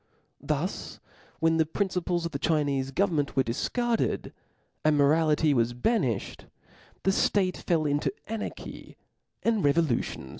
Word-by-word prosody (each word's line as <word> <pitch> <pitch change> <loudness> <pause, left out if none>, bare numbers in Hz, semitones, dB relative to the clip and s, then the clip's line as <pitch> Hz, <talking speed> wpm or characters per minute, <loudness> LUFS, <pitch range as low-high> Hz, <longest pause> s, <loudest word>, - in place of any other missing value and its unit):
Thus - - -3 0.4
when 165 0 +3
the 160 - +3
principles 180 -1 -1
of 170 - -3
the 140 - -4
Chinefc 140 -4 0
government 165 -8 +1
were 135 - +4
difcarded, 235 - -1 0.5
and 155 -1 +3
morality 150 +1 +3
was 120 -1 +1
banifbed, 130 - -1 0.6
the 195 - +3
ftate 190 -1 +1
fell 165 -3 0
into 145 0 +1
anarchy, 225 -1 -7 0.5
and 225 -3 +2
revolutions 145 - +1
fucceeded. - - -12
155 Hz, 125 wpm, -28 LUFS, 140-185 Hz, 0.6 s, were